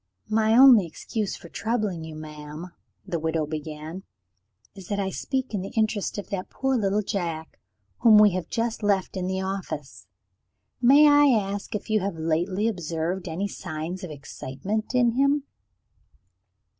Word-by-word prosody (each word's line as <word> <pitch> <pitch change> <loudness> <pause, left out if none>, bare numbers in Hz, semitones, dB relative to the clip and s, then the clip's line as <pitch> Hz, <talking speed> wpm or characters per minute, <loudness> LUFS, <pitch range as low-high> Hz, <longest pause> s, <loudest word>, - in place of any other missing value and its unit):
"My 220 +1 +3
only 250 -8 +8
excuse 205 +6 -4
for - - -12
troubling 210 -4 -2
you, 160 -1 -8
madam," 155 +2 -8 0.3
the 170 - -2
widow 160 0 0
began, 155 +3 -6 0.7
"is 190 -3 -11
that 205 -1 -2
I 190 -1 -1
speak 260 +2 -3
in 200 - -1
the 195 - -5
interest 215 -2 0
of 205 - -6
that 185 -2 -3
poor 265 0 -1
little 210 -2 +1
Jack, 170 -6 -4 0.4
whom 220 -2 +7
we 210 -1 +7
have 180 -2 -4
just 230 0 -2
left 200 -2 +1
in 185 -1 -2
the 190 0 -1
office. 160 - -5 0.7
May 280 +5 +7
I 290 0 +6
ask 205 -5 0
if 210 - -5
you 215 -1 +2
have 195 -2 -3
lately 175 +6 0
observed 175 -1 -2
any 175 +5 -2
signs 180 0 -6
of 180 - -5
excitement 155 - -5
in 240 -2 +4
him?" 280 +3 +2
195 Hz, 155 wpm, -25 LUFS, 165-220 Hz, 0.7 s, only